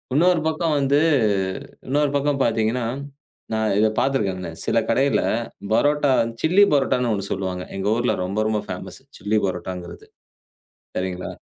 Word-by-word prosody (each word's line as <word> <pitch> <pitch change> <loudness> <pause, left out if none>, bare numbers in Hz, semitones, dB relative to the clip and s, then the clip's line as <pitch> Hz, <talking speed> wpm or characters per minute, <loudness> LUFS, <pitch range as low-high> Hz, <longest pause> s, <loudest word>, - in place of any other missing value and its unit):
இன்னொரு 175 +1 +4
பக்கம் 160 0 0
வந்து, 140 +1 +3 0.9
இன்னொரு 145 +1 +1
பக்கம் 140 -1 +1
பார்த்தீங்கன்னா, 115 +1 0 0.7
நான் 110 -2 +1
இத 110 - +5
பார்த்திருக்கேங்க, 95 -10 0 0.2
சில - - +1
கடைல 135 +4 +2 0.5
பரோட்டா 145 +2 +3 0.3
சில்லி 185 +6 +5
பரோட்டான்னு 130 -3 +2
ஒண்ணு 100 -1 -3
சொல்லுவாங்க. 95 -2 -3
எங்கள் 100 +3 +1
ஊர்ல 120 +1 +1
ரொம்ப, 100 +3 -2
ரொம்ப 105 -1 0
ஃபேமஸ். - - -7 0.2
சில்லி 105 +3 +1
பரோட்டாங்கிறது. 90 -1 -6 0.9
சரிங்களா? 90 -1 -3
115 Hz, 125 wpm, -22 LUFS, 95-140 Hz, 0.9 s, இத